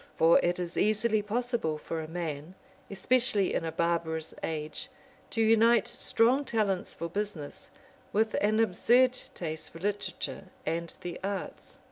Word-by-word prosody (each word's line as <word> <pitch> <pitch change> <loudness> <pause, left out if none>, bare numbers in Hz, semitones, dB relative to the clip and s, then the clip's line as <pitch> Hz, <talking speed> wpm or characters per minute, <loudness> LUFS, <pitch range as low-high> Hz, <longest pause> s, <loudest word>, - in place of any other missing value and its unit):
For 165 +1 +6
it 175 0 +1
is 175 -1 -4
easily 215 +1 +2
possible 225 -6 -1
for 160 +1 -4
a 155 - -6
man, 160 0 -5 0.3
especially 210 -1 +2
in - - 0
a 165 - -2
barbarous 165 -1 -1
age, 155 - -4 0.4
to 225 - +1
unite 225 0 +5
strong 250 +5 +2
talents 210 -7 -1
for 170 - -4
business 185 -5 -5 0.4
with 220 +1 +1
an 215 +1 +2
absurd 240 +5 +4 0.2
taste 160 -2 -4
for - - -12
literature 205 +3 -3 0.2
and 170 0 -2
the 175 -1 -5
arts. 200 0 -5
195 Hz, 140 wpm, -29 LUFS, 165-225 Hz, 0.4 s, For